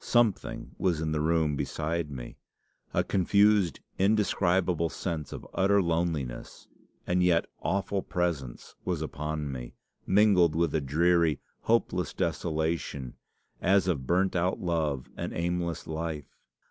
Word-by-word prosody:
Something 120 -4 +1
was 90 -5 +1
in 80 0 -1
the 75 -1 0
room 80 -2 +2
beside 75 +3 -2
me. 65 -4 -8 0.5
A - - +2
confused, 100 0 +3 0.2
indescribable 95 -4 +2
sense 80 -4 -4
of - - -7
utter 100 +1 +3
loneliness, 80 -8 -2 0.4
and 90 +1 +1
yet 90 -2 +3 0.2
awful 100 +1 0
presence, 85 -11 -3
was 85 -4 -1
upon 75 -1 -3
me, 60 -2 -7 0.3
mingled 95 -5 +5
with 85 -2 +1
a 80 - +1
dreary, 80 +1 +2 0.2
hopeless 90 - +1
desolation, 80 -5 -2 0.5
as 95 0 +3
of 70 -8 -1
burnt 95 +2 +2
out 90 +1 +1
love 80 -7 -1
and - - -4
aimless 85 0 -2
life. 80 -2 -5
85 Hz, 125 wpm, -29 LUFS, 75-90 Hz, 0.5 s, mingled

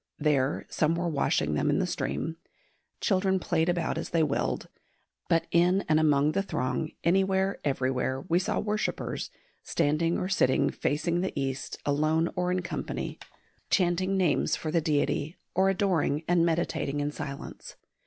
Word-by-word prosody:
There 145 -3 +1
some 160 +1 +1
were 175 +1 -1
washing 140 - +1
them 75 - +1
in - - +2
the - - +1
stream. 75 - -3 0.6
Children 190 -2 +2
played 165 -1 +1
about 170 -2 0
as - - -5
they 165 -2 +2
willed. 145 -2 -1 0.6
But 165 -1 +3
in 180 +3 +3
and 155 0 +4
among 150 -1 +3
the 195 - +1
throng, 130 -4 -2
anywhere, 190 +2 +2
everywhere, 130 -1 0
we 170 +5 +1
saw 185 - -1
worshippers, 210 0 -2 0.3
standing 165 +3 +1
or 180 - -2
sitting 130 -9 +2
facing 170 +4 0
the 185 -5 -2
east, 135 -1 -3
alone 155 +3 +1
or 180 0 0
in 180 0 0
company, - - -4 0.5
chanting 185 +1 +2
names 175 -6 +2
for 155 - -4
the 165 0 +2
deity, 150 +1 0 0.2
or 190 +2 +3
adoring 180 -6 +1
and 175 -1 +3
meditating 165 -3 0
in 145 0 -1
silence. 145 -2 -7
165 Hz, 155 wpm, -28 LUFS, 145-180 Hz, 0.6 s, and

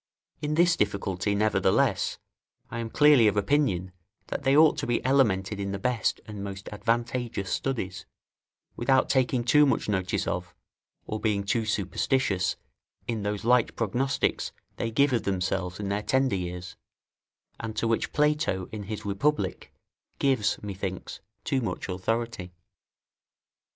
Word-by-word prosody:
In 150 0 -1
this 175 +1 +4
difficulty, 100 - -1
nevertheless, 105 +1 +2 0.5
I 115 - -4
am 115 -1 -3
clearly 145 -4 +6
of 105 - +1
opinion, 100 -6 +1 0.4
that - - -3
they 135 +2 +3
ought 155 0 +6
to 145 - -3
be 120 - +1
elemented 105 -7 +2
in 100 0 -3
the - - -2
best 120 +3 0
and 105 -2 -7
most 100 0 -7
advantageous 115 -1 -2
studies, 110 -9 -3 0.7
without 130 +2 +2
taking 130 -2 +2
too 150 +5 +5
much - - 0
notice 95 -3 0
of, - - -3 0.5
or 110 - -4
being 105 -3 0
too 110 +3 0
superstitious 100 -1 0 0.5
in 115 -3 -2
those 105 +1 -3
light 125 0 +3
prognostics 125 +5 0 0.3
they 115 - -1
give 135 +4 +3
of 120 - +2
themselves 95 -1 -2
in 100 -1 -3
their 100 +1 0
tender 130 +1 +1
years, 90 -1 -5 0.8
and 110 -1 -5
to 115 - 0
which 115 0 0
Plato, 150 - +1
in 105 -2 -6
his 105 +1 -6
Republic, 100 0 -1 0.5
gives, 130 -7 +2
methinks, 95 -2 -5 0.2
too 135 -3 0
much 95 -6 -3
authority. 95 -1 -3
110 Hz, 140 wpm, -27 LUFS, 100-130 Hz, 0.8 s, clearly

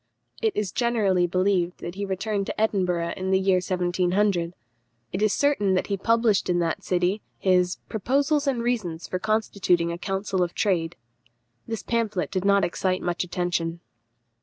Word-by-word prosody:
It 440 -3 +1
is 205 -4 -1
generally 205 -7 +2
believed 185 -1 +1
that 175 - -6
he 200 +2 -4
returned 195 +1 -2
to - - -4
Edinburgh 180 -6 +1
in 190 0 -3
the 190 - +4
year 190 -1 +3
1700. 180 0 0 0.6
It 190 - -2
is 215 -1 +3
certain 210 -10 +2
that 185 - +1
he 200 - -1
published 225 -1 +2
in 175 - +2
that 170 -2 -1
city 180 +3 0 0.2
his 180 -1 +2
Proposals 280 +7 +1
and 245 -4 0
Reasons 200 -9 -2
for 185 - -3
constituting 200 -5 +1
a 170 - -5
Council 195 0 -2
of 175 -1 -1
Trade. 170 -5 0 0.7
This 225 -2 -4
pamphlet 220 -5 -1
did 185 -1 -2
not 200 -1 +4
excite 185 +2 -1
much 175 0 -1
attention. 175 -2 -2
190 Hz, 160 wpm, -25 LUFS, 180-215 Hz, 0.7 s, the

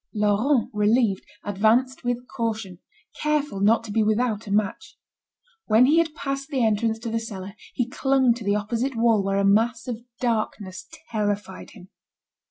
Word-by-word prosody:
Laurent, 210 +5 +2
relieved, 210 -1 +2 0.2
advanced 225 +7 +1
with 245 0 -2
caution, 220 -6 -4 0.4
careful 295 -7 0
not 220 +3 +3
to 220 - -7
be 220 +2 +2
without 215 0 0
a - - -5
match. 210 +10 -1 0.7
When 225 +4 +6
he 305 +5 +4
had 320 -2 0
passed 275 -1 -4
the 265 -6 +1
entrance 220 +1 +1
to 230 -1 -4
the 230 - 0
cellar, 200 -4 -7 0.2
he 245 - 0
clung 265 -2 +2
to 235 -1 -8
the 200 0 +1
opposite 235 +5 -2
wall 225 -3 +3
where 195 0 0
a 200 - +2
mass 225 +5 +2
of 235 -2 -4 0.2
darkness 215 -5 -2 0.2
terrified 205 -3 -3
him. 185 -3 -14
225 Hz, 165 wpm, -24 LUFS, 205-250 Hz, 0.7 s, When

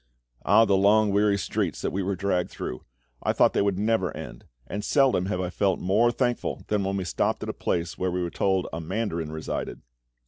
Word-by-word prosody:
Oh 115 - +5
the 100 - +3
long 105 +2 +4
weary 100 0 +3
streets - - -2
that - - 0
we 100 - -2
were 95 +1 -1
dragged 90 -1 0
through! 65 - -6 0.4
I - - +1
thought - - +4
they - - +2
would 100 -2 +1
never 105 -2 +1
end; - - -9 0.2
and 100 +10 -5
seldom 130 -8 +3
have 95 -2 -2
I 90 -1 -2
felt 95 0 +1
more 110 +6 +3
thankful 120 0 -1
than 105 -1 +1
when 95 +1 -1
we 95 - -2
stopped 90 - -1
at - - -4
a - - -2
place 85 0 -2
where 95 - 0
we 90 0 -1
were 85 - -3
told 95 -2 +1
a 80 - -3
mandarin 85 -3 -3
resided. 80 0 -5
95 Hz, 215 wpm, -26 LUFS, 90-105 Hz, 0.4 s, Oh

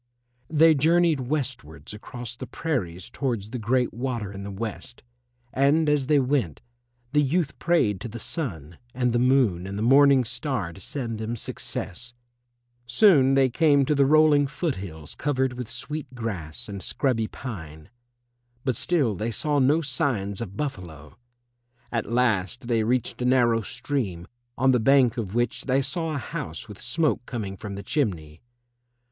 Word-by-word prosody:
They 160 +1 +6
journeyed 165 +1 +3
westwards 120 - -4
across 120 +2 -8
the - - -8
prairies 95 - -3
towards 115 -6 -3
the 125 - -4
Great 125 +3 +1
Water 120 -4 -3
in 100 0 -8
the 100 - -6
West, 110 +4 -6 0.5
and 145 +4 +3
as 145 -3 +2
they 150 -1 +4
went, 125 - 0 0.5
the 150 0 +4
youth 150 +2 0
prayed 110 - +2
to - - -4
the 115 +1 -7
Sun 90 - -4 0.2
and 125 -2 +1
the 120 - +2
Moon 120 -9 +2
and 100 +1 -5
the 105 - -1
Morning 135 +1 +6
Star 125 - -3
to 95 - -12
send 115 -1 -4
them 110 +2 -3
success. 120 +1 -5 0.7
Soon 135 - +5
they 135 -1 +5
came 145 +1 +3
to 150 - +2
the 140 -2 +3
rolling 150 -1 +5
foot 155 +1 -2
hills 80 -6 -7
covered 130 -3 0
with 125 -2 -6
sweet 135 +1 -5
grass 95 -10 -4
and 100 -2 -6
scrubby 115 -3 0
pine. 80 - -8 0.7
But 130 -3 0
still 140 -5 +1
they 105 +4 -3
saw 145 +6 +1
no 145 +5 +3
signs 120 -8 -1
of 100 -3 -6
buffalo. 85 - -6 0.8
At 115 -2 -2
last 120 -1 +1
they 115 -2 +2
reached 125 +2 -1
a - - 0
narrow 120 -3 +3
stream, 110 -8 -3 0.3
on 130 +1 +4
the 125 - +3
bank 130 0 +4
of 105 -3 -4
which 120 +1 -1
they 135 +1 +2
saw 160 +3 -2
a - - -1
house 115 - -5
with 105 -2 -10
smoke 155 -6 0
coming 105 -6 -4
from 100 0 -7
the 100 - -7
chimney. 85 - -2
125 Hz, 165 wpm, -25 LUFS, 105-140 Hz, 0.8 s, They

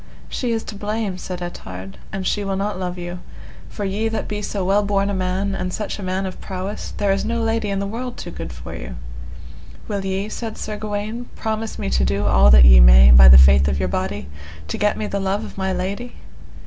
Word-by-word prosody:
She 245 -2 -2
is 225 -1 -1
to - - -8
blame, 205 -2 -3
said 180 -1 -6
Ettard, 95 - -8
an 195 0 -4
she 205 +2 -1
will 195 -1 -2
not 200 0 -2
love 180 -1 -4
you, 175 0 -6 0.5
for 205 - -5
ye 205 +3 -1
that 225 0 -3
be 210 0 -4
so 200 -2 -3
well 200 +2 +3
born 200 0 0
a - - -2
man, 190 +1 -1
and 185 -1 -3
such 210 +2 -4
a - - -6
man 185 +1 -2
of 185 - -7
prowess, 190 +2 -6
there 200 -1 +1
is 195 - 0
no 230 +2 -2
lady 225 -2 -1
in 200 - -1
the 200 - -2
world 240 +4 -5
too - - -7
good - - -7
for 60 - -9
you. - - -7 0.9
Will 200 -2 -3
ye, 195 +1 -2
said 220 0 -6
Sir 215 - -5
Gawaine, 215 +3 -5
promise 220 0 -3
me 205 - -4
to - - +1
do 100 +1 0
all 70 -10 +5
that 60 -1 +8
ye 65 0 +8
may, 60 +1 +8
by 65 +1 +9
the 65 0 +10
faith 65 +1 +6
of 70 0 0
your 65 - -1
body, 70 0 -3 0.4
to - - -3
get 210 0 +1
me 215 - -3
the 200 - -3
love 195 +1 -1
of - - -11
my 190 -1 -2
lady? 200 +7 -4
195 Hz, 235 wpm, -21 LUFS, 175-210 Hz, 0.9 s, the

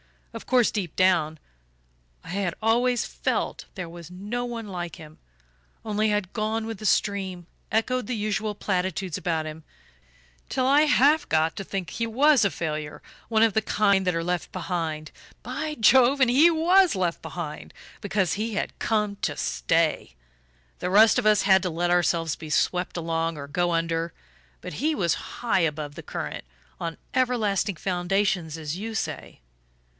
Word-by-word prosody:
Of - - -8
course, 250 -3 +3
deep 190 -7 -4
down, 170 -4 +2 0.9
I - - -12
had 185 -1 -2
always 240 +2 +2
FELT - - -2
there 180 -4 -5
was 170 -1 -10
no 205 +7 -4
one 230 -2 -5
like 175 -3 -5
him 155 0 -13 0.7
only 215 0 +1
I - - +2
had 200 -3 -3
gone 220 0 -1
with 225 -3 -6
the 215 - -7
stream, 190 -4 0 0.3
echoed 235 +1 0
the 250 - -2
usual 215 0 -2
platitudes 190 -3 -2
about 160 -3 -1
him, 155 +1 -8 0.9
till 255 - 0
I 285 +3 +5
half 295 +1 +4
got 160 +1 +2
to 195 - -3
think 190 -3 -4
he 230 0 -2
was 275 +3 +4
a 200 - +3
failure, 155 -4 -4 0.2
one 220 -1 +3
of 225 -2 +3
the 220 - +2
kind 200 -3 +2
that 180 - +2
are 165 - -1
left 180 0 -2
behind. 165 -4 -3 0.3
By 280 +6 -4
Jove, 260 +3 +5
and 255 - +5
he 295 +7 +6
WAS 345 - +4
left 180 -3 -1
behind 155 -4 -7 0.3
because 195 -5 0
he 220 +2 -2
had - - -3
come 210 -2 0
to - - -2
stay! - - 0 0.6
The 180 - -2
rest 215 +4 +6
of - - 0
us 210 -1 +4
had 190 -1 +5
to 180 - 0
let 175 +1 -1
ourselves 170 -3 +2
be 155 - -9
swept 180 +4 0
along 165 -1 -1
or 140 -1 -7
go 175 +4 0
under, 165 0 -1 0.5
but - - -7
he 310 - 0
was 170 - +1 0.2
high 235 -5 +1
above 150 -3 -1
the - - -8
current - - -6 0.3
on 165 -1 -4 0.2
everlasting 220 -6 +1
foundations, 175 -1 -1
as 155 +1 -4
you 220 +3 -5
say. 220 - -5
195 Hz, 170 wpm, -25 LUFS, 170-225 Hz, 0.9 s, he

